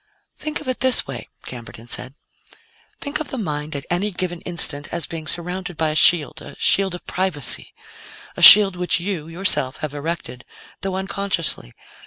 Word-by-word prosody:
"Think 305 -1 -3
of - - -10
it 255 - -2
this 260 -1 +6
way," - - -8 0.2
Camberton 115 -2 -9
said. 130 +2 -4 0.9
"Think 285 +2 -3
of 310 - -5
the 265 - -6
mind 150 -7 -4
at 140 - -6
any 185 +4 0
given 175 -3 -5
instant 150 -4 -3
as 170 -1 -3
being 160 -1 -8
surrounded 180 0 -5
by 160 -1 0
a - - -5
shield 155 -1 +4
a - - -11
shield 190 -2 +2
of 180 - -12
privacy 180 -9 -1 0.6
a - - -7
shield 200 -3 +10
which 180 0 0
you, 175 -4 -4
yourself 165 -6 +1
have 150 - -8
erected, 145 -4 -6 0.4
though 195 -1 -3
unconsciously. 190 - -3
175 Hz, 170 wpm, -20 LUFS, 150-195 Hz, 0.9 s, shield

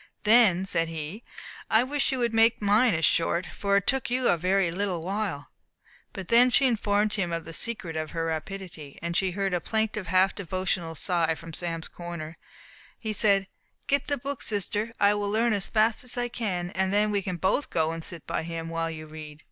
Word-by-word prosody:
"Then," 210 -4 +5
said 165 -3 0
he, 165 +7 -6 0.5
"I 220 +2 +5
wish 280 +2 0
you 265 - -1
would 235 -2 0
make 225 +1 +4
mine 210 +1 +3
as 160 0 +2
short, 170 +4 +1
for 200 0 +1
it 200 - 0
took 265 -2 0
you 250 0 +1
a - - +4
very 180 +1 +1
little 180 -2 -2
while." 190 -6 -3 0.6
But 190 -2 -8
when 245 +2 +7
she 270 +2 +4
informed 210 -3 +1
him 190 -5 -1
of 165 -1 -3
the 165 - -8
secret 185 -6 -3
of 155 -1 -3
her 165 -1 -3
rapidity, 165 -2 -6
and 170 0 -2
he 190 +1 +2
heard 195 +1 -2
a 175 - 0
plaintive, 220 -2 -2
half 185 +1 +3
devotional 185 -3 -3
sigh 165 -1 0
from 165 0 -11
Sam's 165 -1 -3
corner, 170 -2 -8 0.6
he 220 -1 -4
said, 200 -2 +3 0.4
"Get 280 0 +1
the 285 - 0
book, 275 +1 -5
sister; 210 +1 -1
I 200 0 +5
will 205 -1 -2
learn 225 +2 +2
as 200 -2 -1
fast 220 +1 +2
as 250 0 0
I 245 0 0
can, 185 -7 -3
and 190 0 0
then 210 +1 +2
we 200 -1 +1
can 185 -1 -3
both 190 - 0
go 160 -1 +1
and 165 0 -6
sit 170 -2 -6
by - - -2
him, 165 0 -5
while 165 0 -2
you 155 -1 -7
read." 155 -1 -10
190 Hz, 210 wpm, -27 LUFS, 165-220 Hz, 0.6 s, when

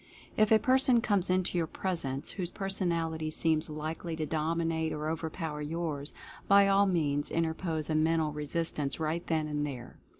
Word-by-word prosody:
If 215 0 +3
a 220 - +8
person 255 +1 +4
comes 205 -6 +1
into 185 -1 +1
your 165 - 0
pres 180 +1 -2
ence 135 +1 -4
whose 180 -3 -3
personality 170 -5 -1
seems 155 0 0
likely 155 +2 -4
to 160 -1 -2
dominate 160 +1 -1
or 150 0 -3
overpower 160 -1 -3
yours, 150 -2 -3 0.4
by 200 0 +6
all 200 0 +4
means 145 -5 0
interpose 160 -1 -1
a 160 - -1
mental 160 0 +2
re 150 0 -4
sistance 150 -4 -1
right 160 +2 -1
then 160 -2 0
and 150 -1 -2
there. 130 -5 -6
160 Hz, 170 wpm, -30 LUFS, 155-180 Hz, 0.4 s, a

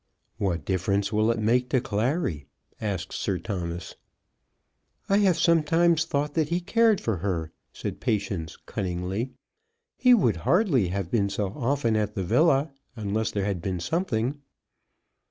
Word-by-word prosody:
"What 85 -7 -1
difference 100 +2 0
will 110 +1 +3
it 115 - +1
make 120 +3 +2
to 130 - +3
Clary?" 110 - -1 0.3
asked 95 -4 -3
Sir 95 -3 -1
Thomas. 85 -2 -5 1.1
"I 200 - +3
have 190 -5 +3
sometimes 165 0 +3
thought 145 -2 -1
that 155 -2 +1
he 170 +1 +1
cared 220 +3 +3
for 110 -4 -1
her," 85 -3 -2 0.2
said - - -5
Patience 100 -9 -2
cunningly. 95 +6 -3 0.7
"He 250 -1 +6
would 120 - +2
hardly 140 - +2
have 95 -1 -3
been 100 -4 +2
so 100 0 -2
often 125 -3 0
at 105 -1 -1
the 95 - -1
villa, 145 - +3 0.2
unless 110 -1 -1
there 100 -2 -2
had 100 -4 -2
been 90 0 -2
something." 140 - -1
110 Hz, 145 wpm, -26 LUFS, 95-150 Hz, 1.1 s, He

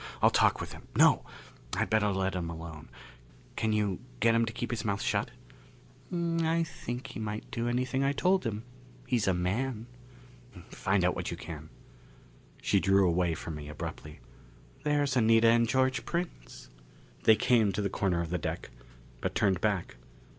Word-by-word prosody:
I'll - - +5
talk - - +3
with - - -5
him. - - -13
No! - - +5 0.5
I'd - - -1
better 110 -1 +3
let 95 -2 0
him 90 -2 -3
alone. 80 -2 -8 0.7
Can 110 - 0
you 105 -3 0 0.2
get 115 0 +4
him 115 0 +3
to - - -2
keep 120 +2 -4
his 120 -1 -2
mouth 100 -3 -1
shut?" - - 0 0.8
"I 165 -1 +1
think 125 -5 -6
he - - -7
might 105 0 -5
do 120 -2 -2
anything 130 +2 0
I 140 - +3
told 185 +6 +2
him. 110 -2 -3 0.4
He's 115 -5 +1
a 95 - +4
man!" 110 +6 -1 0.9
"Find 100 -3 +1
out 90 - +3
what - - -3
you - - -5
can." 80 -2 -8 0.9
She - - +3
drew 95 +2 +4
away 85 -1 +1
from 80 - -6
me 75 -1 -7
abruptly. 75 0 -7 0.6
"There's 145 -3 +1
Anita 115 -1 +5
and 115 0 +4
George 130 -1 +2
Prince." 165 - -5 0.5
They 110 - +8
came 115 -4 +3
to 95 - -2
the - - +2
corner 90 -3 0
of 85 - -7
the 90 - 0
deck, 75 - -4 0.5
but - - -3
turned 95 -3 +2
back. 100 - -1
110 Hz, 170 wpm, -30 LUFS, 90-125 Hz, 0.9 s, They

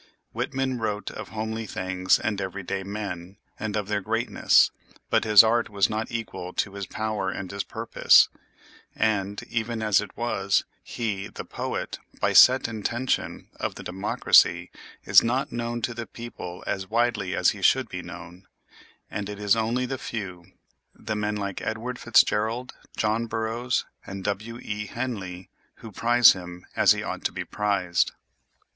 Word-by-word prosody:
Whitman 130 -2 -2
wrote 105 -2 -2
of - - -8
homely 110 0 -4
things 95 -1 +1
and 105 -2 -2
every 95 +1 -4
day 95 +2 -3
men, 95 -2 -6 0.2
and 110 -1 -3
of 105 -2 -2
their 105 -1 -1
greatness, - - +3 0.4
but - - +3
his 105 -1 +9
art 115 +1 +2
was 100 0 +2
not 110 +2 -3
equal 115 -6 -5
to 100 - -1
his 100 -2 -5
power 110 -3 -2
and 95 -1 -5
his 100 0 -3
purpose; - - +4 0.7
and, 100 -2 0
even 115 0 -3
as 105 -2 +4
it 105 - -10
was, 100 -5 +1 0.2
he, 100 -4 -3
the 100 - -8
poet, - - -4 0.2
by - - +1
set - - +7
intention, 115 +3 -2
of - - -2
the - - -8
democracy, 95 +3 +3 0.3
is - - +7
not 125 +4 -1
known 120 0 -3
to 120 - -1
the 115 -1 -6
people 105 -7 -8
as 95 -1 -3
widely 115 -5 0
as - - +4
he - - -9
should - - +4
be - - -6
known; 90 +3 -11 0.6
and 105 -1 -4
it 105 - -6
is 105 0 +3
only 115 +3 0
the 130 0 -4
few—the 95 +1 -8
men 105 0 -1
like 100 -2 -4
Edward 120 +3 -4
FitzGerald, 115 +1 +2 0.3
John 110 +2 0
Burroughs, 115 +2 -1 0.2
and 100 -1 -6
W. 110 +4 -3
E. 105 0 -4
Henley—who 105 -3 -7
prize 120 +3 +6
him 90 -1 -9
as - - +5
he - - -4
ought - - -5
to - - +1
be - - -5
prized. 100 -4 0
105 Hz, 160 wpm, -26 LUFS, 95-115 Hz, 0.7 s, his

